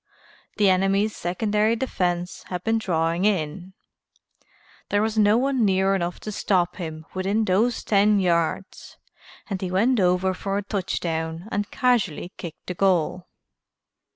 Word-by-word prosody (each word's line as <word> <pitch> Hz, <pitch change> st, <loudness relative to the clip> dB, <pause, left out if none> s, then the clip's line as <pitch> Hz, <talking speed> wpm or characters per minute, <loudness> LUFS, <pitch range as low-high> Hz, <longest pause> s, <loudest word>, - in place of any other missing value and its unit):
The 205 Hz, -2 st, +4 dB
enemy's 195 Hz, +3 st, +2 dB
secondary 210 Hz, +5 st, 0 dB
defense 180 Hz, -8 st, -2 dB
had 180 Hz, -1 st, -5 dB
been 225 Hz, 0 st, +1 dB
drawing 170 Hz, -3 st, 0 dB
in, 185 Hz, -2 st, -1 dB, 1.2 s
there 205 Hz, -, +2 dB
was 220 Hz, 0 st, -1 dB
no 210 Hz, 0 st, +4 dB
one 265 Hz, -1 st, +1 dB
near 190 Hz, -1 st, +2 dB
enough 175 Hz, -2 st, -2 dB
to 215 Hz, -, -5 dB
stop 180 Hz, -3 st, 0 dB
him 160 Hz, -3 st, -6 dB
within 200 Hz, +4 st, 0 dB
those 220 Hz, +5 st, +1 dB
ten 205 Hz, 0 st, +3 dB
yards 175 Hz, +1 st, -1 dB, 0.5 s
and 195 Hz, -3 st, -4 dB
he 185 Hz, -, -2 dB
went 225 Hz, +7 st, +2 dB
over 180 Hz, 0 st, +2 dB
for 195 Hz, +1 st, -3 dB
a 205 Hz, -, -2 dB
touchdown 165 Hz, -3 st, -3 dB
and 205 Hz, 0 st, -2 dB
casually 215 Hz, -, 0 dB
kicked 170 Hz, -3 st, -9 dB
the 180 Hz, -, -4 dB
goal." 180 Hz, -1 st, +1 dB
190 Hz, 140 wpm, -24 LUFS, 175-210 Hz, 1.2 s, The